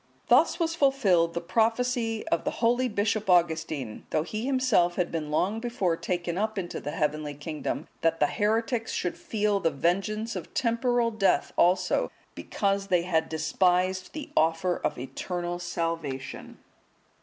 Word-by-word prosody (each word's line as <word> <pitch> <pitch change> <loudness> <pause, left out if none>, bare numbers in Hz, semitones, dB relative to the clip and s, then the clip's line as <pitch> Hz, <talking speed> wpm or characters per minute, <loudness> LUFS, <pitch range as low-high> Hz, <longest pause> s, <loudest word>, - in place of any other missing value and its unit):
Thus - - +5
was 330 -1 +1
fulfilled 220 - +3
the 170 - -1
prophecy 225 +4 0
of 170 - +1
the - - 0
holy 245 +2 +2
Bishop 205 -1 -1
Augustine, 160 -8 +1
though 155 - +1
he 215 +8 -4
himself 250 -10 +2
had 180 -2 -1
been 155 -3 -3
long 190 +8 0
before 225 -8 0
taken 175 +1 -2
up 215 0 -1
into 175 -3 -3
the 145 - -5
heavenly 150 -1 -2
kingdom, 150 +1 -4
that 165 0 +1
the 150 - +5
heretics 225 - 0
should 180 - -2
feel 210 -2 0
the 165 - +2
vengeance 195 +9 -1
of - - -7
temporal 235 0 +1
death 210 -3 +1
also, 180 +1 +2 0.2
because 195 -1 -1
they 180 -3 +2
had 160 -3 0
despised 180 +4 +1
the 305 -2 -7
offer 165 +3 +2
of - - -1
eternal 175 +7 -4
salvation. 165 -6 -4
185 Hz, 150 wpm, -27 LUFS, 165-225 Hz, 0.2 s, Thus